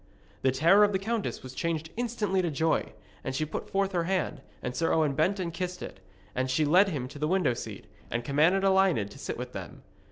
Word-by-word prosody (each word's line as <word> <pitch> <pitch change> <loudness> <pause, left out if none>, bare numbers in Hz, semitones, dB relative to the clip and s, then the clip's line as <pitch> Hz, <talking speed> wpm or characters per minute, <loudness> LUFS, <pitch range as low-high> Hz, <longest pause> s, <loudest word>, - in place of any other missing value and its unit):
The 130 - +3
terror 170 +10 +5
of 205 0 +3
the - - +3
countess 220 +2 -2
was 130 0 -8
changed 160 +1 -2
instantly 220 -5 0
into 175 -2 +1
joy, 160 +2 0 0.3
and 130 - -3
she 155 - 0
put 150 - -5
forth 195 0 +1
her 175 -3 0
hand, 170 -6 -1 0.2
and 125 0 -3
Sir 165 +5 +1
Owen 155 -3 +2
bent 185 +8 +1
and 170 -3 -3
kissed 180 +1 -4
it, - - -8 0.3
and 130 +1 -1
she 150 +4 +2
led 185 +7 +5
him 135 -8 -3
to 145 - -10
the 150 - 0
window 175 -7 +2
seat, - - -7 0.2
and 120 0 -2
commanded 160 +8 +3
Elined 190 - +3
to - - -12
sit - - -4
with - - -6
them. - - -8
165 Hz, 225 wpm, -29 LUFS, 140-190 Hz, 0.3 s, terror